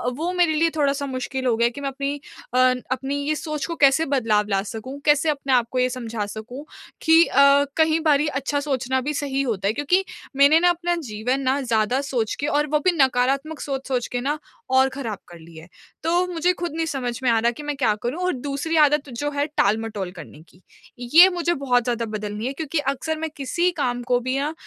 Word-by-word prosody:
वो 335 +5 -2
मेरे 350 -3 +2
लिए 330 +2 +2
थोड़ा-सा 280 -2 0
मुश्किल 260 0 -4
हो 235 -3 +2
गया 235 - +3
है 240 - +2
कि 285 - -9
मैं 275 - -2
अपनी 280 +1 -3 0.4
अ, - - +1 0.3
अपनी 270 +2 -2
ये 310 - +1
सोच 305 -1 -4
को 335 - -4
कैसे 280 +3 +4
बदलाव 225 -7 +1
ला 195 -1 +1
सकूँ? 240 +6 -7
कैसे 300 +1 +3
अपने 275 -2 -1
आपको 245 +1 +1
ये 250 0 +2
समझा 230 -4 -4
सकूँ 225 +7 -8 0.4
कि 325 +1 +6
अ, 280 +1 +5
कई 320 0 +3
बारी 295 0 +3
अच्छा 285 +1 -2
सोचना 260 -2 -1
भी 300 +3 -3
सही 275 -1 -2
होता 210 -7 -1
है। 215 - +1
क्योंकि 355 +8 +1 0.3
मैंने 285 +4 +6
ना 355 - +4
अपना 350 0 0
जीवन 245 +6 -2
ना 270 +1 +1
ज़्यादा 235 +2 +1
सोच 245 -6 -2
के 290 - -1
और 295 0 +1
वो 300 - +4
भी 370 - +5
नकारात्मक 270 +3 +1
सोच-सोच 265 -3 -3
के 245 - -1
ना 290 +3 -1 0.4
और 265 0 +5
ख़राब 235 -7 -5
कर 175 -1 -13
ली 165 0 -15
है। 160 +2 -12 0.4
तो 345 +3 +2
मुझे 355 +1 +1
ख़ुद 345 -2 -3
नहीं 325 0 -1
समझ 255 -6 -3
में 250 - +3
आ 225 - +3
रहा 235 +1 +2
कि 295 +5 -10
मैं 295 0 -3
क्या 225 -6 +2
करूँ? 250 +8 -3
और 365 - +1
दूसरी 280 +5 -3
आदत 295 -1 +3
जो 290 +5 -3
है 285 0 -1
टाल-मटोल 215 -8 -1
करने 165 -4 -12
की। 180 - -23 0.4
ये 325 +10 +7
मुझे 345 -1 -1
बहुत 250 -5 +1
ज़्यादा 235 -1 -1
बदलनी 215 0 -5
है 270 - -3
क्योंकि 310 +1 -2
अक्सर 315 +4 -4
मैं 320 0 -3
किसी 340 +6 0
काम 245 -2 -1
को 245 - +4
भी 255 +2 -2
ना 295 +2 -2
275 Hz, 220 wpm, -23 LUFS, 245-300 Hz, 0.4 s, ये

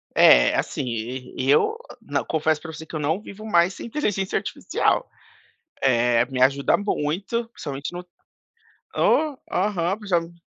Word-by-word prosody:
É, - - +7
assim, - - -2
e 125 +3 -4
eu 430 - +3 0.2
não, - - -2
confesso 155 -1 +1
pra 160 - -7
você 160 +1 -8
que - - -15
eu 155 - -2
não 160 +7 0
vivo 215 0 -10
mais 175 -3 +3
sem - - -8
inteligência 210 -7 -1
artificial. - - -1 0.7
Eh, 120 -2 +3
me 125 0 -4
ajuda 135 +2 +4
muito, 205 +5 -2
principalmente 145 -6 -6
no 180 +1 -7 0.9
Oh, 305 -3 +2 0.2
aham, 190 -1 0
principalmen 170 -5 -1
165 Hz, 145 wpm, -23 LUFS, 135-200 Hz, 0.9 s, É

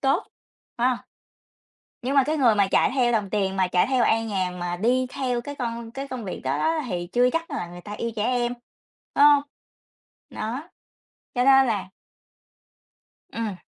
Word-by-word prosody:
tốt, 270 0 +1 0.5
phải 245 - +3
hông? 250 -2 0 1.0
Nhưng 265 +3 -1
mà 275 - +6
cái 305 +4 -1
người 240 -6 +4
mà 200 -1 +3
chạy - - +3
theo 245 -3 +3
đồng 210 -4 0
tiền 195 -2 0
mà 185 -1 +3
chạy 180 0 +2
theo 255 -3 +2
an 225 +1 +2
nhàn 185 -3 -2
mà 175 0 -2
đi 250 +6 +2
theo 250 -2 -2
cái 285 +4 -7
con 235 -3 -4
cái 275 +3 -6
công 255 -3 -6
việc 185 - -5
đó 135 +2 0
đó 320 - +1
thì 175 -2 -3
chưa 245 +1 +4
chắc 330 +4 -3
là 230 -11 -3
người 175 0 -10
ta 205 +4 -8
yêu 230 +2 -3
trẻ 210 - -1
em, 245 0 0 0.6
phải 285 - +5
hông? 290 -1 +7 0.9
Đó. 250 +10 -5 0.7
Cho 245 -1 +2
nên 270 0 +6
là 210 -5 0 1.5
Ừm. 225 -3 -3
240 Hz, 190 wpm, -24 LUFS, 205-265 Hz, 1.5 s, hông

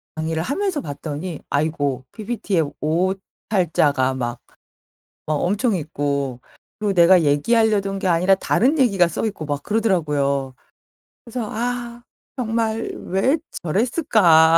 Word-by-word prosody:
강의를 160 +1 -2
하면서 350 - -1
봤더니 150 +2 -5
아이고, 145 -3 0
PPT에 205 -5 -1 0.2
오탈자가 165 -4 0
막 120 -1 -3 0.9
막 155 - 0
엄청 205 - +1
있고 140 -4 -2 0.4
그리고 210 -1 0
내가 175 0 +6
얘기하려던 200 +6 +2
게 190 - -1
아니라 180 +3 +4
다른 250 - +2
얘기가 200 -10 +4
써 170 - -3
있고 200 -8 -4
막 145 -1 -3
그러더라고요. 150 - 0 0.7
그래서 235 -2 -5
"아. 240 +1 -3 0.3
정말 225 -1 -1
왜 225 - +2 0.3
저랬을까?" 175 - +4
180 Hz, 270 characters per minute, -21 LUFS, 150-225 Hz, 0.9 s, 내가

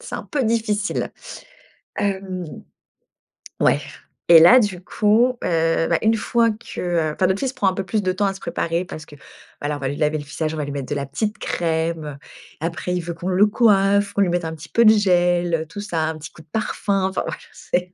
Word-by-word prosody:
c'est - - -8
un - - -6
peu 285 -3 -2
difficile. 220 -3 -1 0.8
Hem, 190 -2 -2 1.2
ouais - - +4 0.5
et 170 -1 +9
là 205 +11 +8
du 195 -6 -2
coup, 230 +6 +2
heu, 165 -1 +1
bah, - - +2
une 220 +1 +3
fois 230 +1 +2
que, 215 +2 -8
heu 170 -3 0
enfin 185 - +1
notre 190 +2 0
fils 265 -1 -2
prend 200 - 0
un - - -3
peu 195 - -3
plus 210 +4 0
de 185 - +1
temps 200 +2 0
à 195 - 0
se 195 - -11
préparer 170 0 -2
parce 155 -3 -9
que, 145 - -14 0.5
voilà, 145 0 -2
on - - -11
va 135 - -2
lui 140 - -3
laver 155 0 +1
le 145 - -6
visage, 155 +2 -3
on - - -5
va 150 - -2
lui 145 - -5
mettre 140 -2 -5
de - - -1
la 140 -1 -2
petite 215 - -3
crème, 160 -3 -2 0.4
après 170 +2 -3
il 180 - -1
veut 170 0 -5
qu'on 170 +2 -7
le 190 +3 +4
coiffe, 200 -2 +3
qu'on 200 - +1
lui 190 - +3
mette 175 -1 -1
un 160 0 -4
petit 160 +2 -12
peu 235 - +3
de - - +9
gel, 175 -4 +2
heu, 160 - -3
tout 175 +6 -9
ça, 175 -6 -2
un 160 0 -3
petit 155 +1 -9
coup - - -15
de 155 - -22
parfum, 200 -3 -1
enfin, 190 - -2
voila, - - -4 0.2
c'est 180 +1 -3
180 Hz, 235 wpm, -21 LUFS, 160-205 Hz, 1.2 s, et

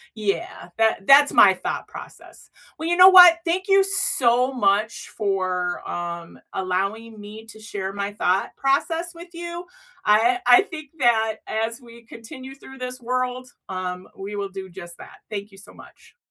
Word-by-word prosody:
yeah, 205 -4 -4
that 220 -3 +1
that's 285 +1 +7
my 195 - +6
thought 185 - -5
process. - - -13 0.3
Well, 320 +1 -3
you 345 - 0
know 365 +1 +9
what? 355 -3 +9
Thank 360 +2 -1
you 390 0 +4
so 260 -10 +2
much 215 -2 -1
for, 185 -4 -3
um, 170 -1 -6
allowing 195 +4 -3
me 215 +2 -11
to 220 -1 -13
share 200 -3 -6
my 200 0 -4
thought 190 -2 -1
process 325 +5 -1
with 340 +2 -11
you. 345 +1 -7 0.4
I 225 +4 +3
I 245 +6 +7
think 310 -6 -10
that 225 -3 +2
as 225 +1 -3
we 235 -1 -16
continue 260 +4 -11
through 265 -1 -14
this 255 0 -6
world, 255 +1 -3 0.2
um, 185 -1 -6
we 200 +2 -7
will 200 -1 -4
do 190 -1 -9
just 175 -1 -11
that. - - -14
Thank 205 -1 -6
you 195 - -17
so 195 - -14
much. - - -18
225 Hz, 165 wpm, -22 LUFS, 195-270 Hz, 0.4 s, know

